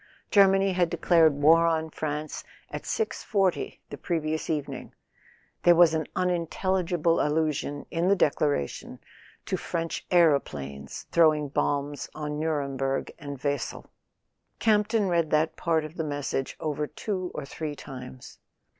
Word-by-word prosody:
Germany 195 -1 +5
had 180 -2 +2
declared 165 -4 +4
war 165 +2 +6
on 160 -1 0
France 150 0 -4 0.3
at - - -6
6.40 200 - -1
the - - -7
previous 160 -2 -2
evening; 140 -4 -4 0.7
there 175 0 +6
was 170 -1 +6
an 160 -2 -1
unintelligible 175 -1 +1
allusion, 150 -1 -1
in 170 +1 0
the 200 - +5
declaration, 145 - 0 0.5
to - - -1
French 165 -1 -3
aeroplanes 70 - +1
throwing 155 -3 +4
bombs 145 +1 -1
on 150 -1 -4
Nuremberg 140 -4 -1
and 145 -3 -6
Wesel. 145 -3 -3 0.7
Campton 210 -1 +2
read 170 -3 +1
that 155 +1 +2
part 160 -2 0
of 155 - -9
the 160 - -1
message 145 -3 -3
over 150 -1 -2
two 185 -1 -4
or 150 - -4
three 150 +1 -5
times. 130 -3 -10
155 Hz, 130 wpm, -27 LUFS, 145-175 Hz, 0.7 s, war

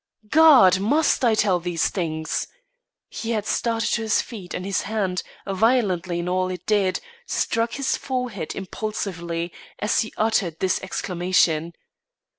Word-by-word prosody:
"God! 270 - +7
Must 285 +9 +2
I 230 -3 +4
tell 195 -4 +2
these 170 -1 0
things?" 160 -4 -2 0.6
He 225 - -6
had 210 -2 -1
started 230 0 0
to 230 - +1
his 220 -1 +2
feet 195 -7 -6
and 180 - -4
his 195 -1 0
hand, 195 -4 -1 0.2
violent 195 -3 +1
in 175 -1 -2
all 185 0 0
it 180 -1 -6
did, 200 -3 +1 0.3
struck 230 +1 0
his 275 -1 0
forehead 250 - -4
impulsively, 180 -4 -4 0.2
as 210 - +1
he 220 - -4
uttered 200 -7 +1
this 190 -1 +1
exclamation. 175 -3 0
195 Hz, 140 wpm, -23 LUFS, 175-225 Hz, 0.6 s, God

